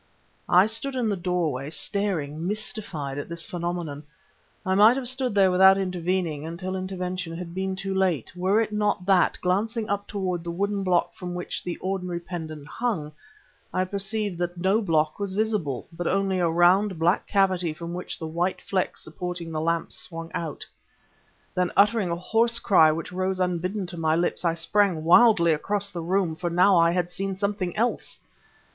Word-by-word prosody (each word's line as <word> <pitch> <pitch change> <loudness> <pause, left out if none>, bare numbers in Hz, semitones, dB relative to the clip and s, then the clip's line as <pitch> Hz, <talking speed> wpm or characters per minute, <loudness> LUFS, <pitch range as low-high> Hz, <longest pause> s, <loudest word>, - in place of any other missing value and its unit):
I 180 +2 +6
stood 230 +5 -2
in 240 -4 0
the 205 - 0
doorway 170 -7 -1
staring, 165 -2 -1
mystified, 190 -9 -3
at 145 - -6
this 170 -1 -3
phenomenon; 170 -4 -4 0.6
I 190 - +1
might 210 +5 +6
have 260 -2 -3
stood 260 -3 -1
there 195 -2 +5
without 190 +1 +6
intervening, 180 -4 -1
until 180 +4 -5
intervention 185 -2 -4
had 170 -1 -7
been 190 +1 -2
too 195 0 -3
late, 185 -8 0
were 190 +4 +2
it 225 -1 0
not 210 -3 0
that, 190 -2 +3
glancing 215 +5 0
upward 205 -1 -2
toward 185 -4 -3
the 170 - -5
wooden 200 +3 -1
block 180 -2 +1
from 180 -1 -6
which 180 - -3 0.2
ordinarily 185 -2 -2
the 170 - -9
pendant 155 -4 -6
hung, 175 -9 -2 0.6
I 185 - 0
perceived 200 -1 -1
that 175 0 -2
no 190 +5 +2
block 160 -5 +1
was 200 -2 -3
visible, 205 - -1
but 175 +1 -3
only 195 -1 +1
a 170 -2 +2
round, 180 +3 +3
black 170 +4 +1
cavity 185 -4 +2
from 170 +2 -7
which 180 +1 -5
the 160 - -6
white 170 +4 -1
flex 190 -2 -2
supporting 175 +1 -5
the 155 -1 -2
lamp 165 +1 -1
swung 165 -7 -6
out. 160 -3 -4 0.9
Then, 180 -1 0
uttering 205 -1 +4
a 170 - 0
horse 230 +6 +1
cry 165 -9 +5
which 160 +2 -4
rose 185 +1 -1
unbidden 180 +2 -1
to 175 -1 -8
my 160 -1 +1
lips, 175 +2 0
I 165 -1 +1
sprang 170 0 +1
wildly 170 -2 +6
across 200 +6 -1
the 175 - -5
room... 175 -1 0
for 175 +1 -3
now 180 +3 +4
I 170 -1 +5
had 175 0 -1
seen 195 +1 -3
something 200 -1 -2
else! 235 +3 -1
180 Hz, 180 wpm, -25 LUFS, 170-200 Hz, 0.9 s, I